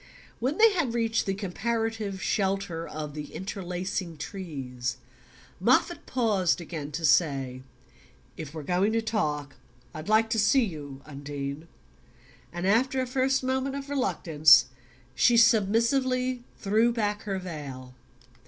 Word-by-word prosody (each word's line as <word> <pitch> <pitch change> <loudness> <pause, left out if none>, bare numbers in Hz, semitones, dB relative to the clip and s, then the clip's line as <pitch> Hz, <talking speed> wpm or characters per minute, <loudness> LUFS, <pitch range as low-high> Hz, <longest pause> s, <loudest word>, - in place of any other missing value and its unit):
When 260 +6 -1
they 445 -1 +6
had 285 -11 0
reached 225 -2 0
the 195 - 0
comparative 220 0 -2
shelter 195 -4 -1
of 150 -1 -6
the 150 -1 -7
interlacing 180 -2 -4
trees 135 -8 -5 0.6
Moffatt - - +2
paused 210 -10 +1
again 160 -4 -6
to 165 +2 -2
say: 135 -7 +2 0.7
"If 155 -3 -7
we're 155 -1 -7
going 185 +7 +1
to 225 - +2
talk 150 - -2 0.4
I'd 155 +5 -7
like 220 +1 +3
to 225 - +2
see 230 +5 +4
you. 145 -7 -8
Undine;" 145 +1 -6 0.8
and 175 +1 -4
after 255 +7 +2
a 255 - +1
first 265 +1 +1
moment 265 +1 -1
of 280 0 -6
reluctance 160 - +5 0.5
she 240 - +4
submissively 240 +3 +3
threw 220 +4 +3
back 210 -2 -1
her 195 -2 -2
veil. 140 -8 -7
195 Hz, 130 wpm, -27 LUFS, 155-230 Hz, 0.8 s, they